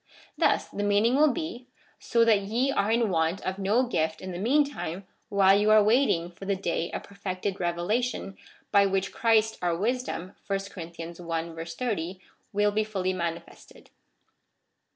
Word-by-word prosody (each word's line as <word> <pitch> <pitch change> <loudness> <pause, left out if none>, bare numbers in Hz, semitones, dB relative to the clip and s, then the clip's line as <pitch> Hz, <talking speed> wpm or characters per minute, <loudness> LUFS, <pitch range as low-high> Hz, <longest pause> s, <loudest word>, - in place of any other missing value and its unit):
Thus - - +2
the 205 - -5
meaning 205 +3 +3
will 300 +1 +5
be, 255 -4 -5 0.2
" - - -32
So 230 -1 +2
that 215 -3 +4
ye 235 +7 0
are 205 -5 +1
in 235 +1 +3
Avant 170 -3 +1
of 190 +1 -3
no 205 +6 +2
gift 160 -9 -1
in 185 - -6
the 175 - -5
meantime 240 - 0 0.2
while 195 -2 +5
you 205 +1 +3
are 215 -1 +7
waiting 210 -7 +2
for 190 +2 -11
the 200 0 +1
day 170 -3 -2
of - - -5
perfected 195 -1 -4
revelation, 195 +5 -1 0.4
by 200 -1 +5
which 195 0 -1
Christ 220 -1 +2
our 175 -2 0
wisdom 220 -4 -2 0.2
(verse 195 0 -2
30th) 170 +2 -5 0.3
will 205 0 +2
be 215 +1 +1
fully 190 -3 -2
manifested." 170 -2 -6
200 Hz, 155 wpm, -27 LUFS, 175-220 Hz, 0.4 s, are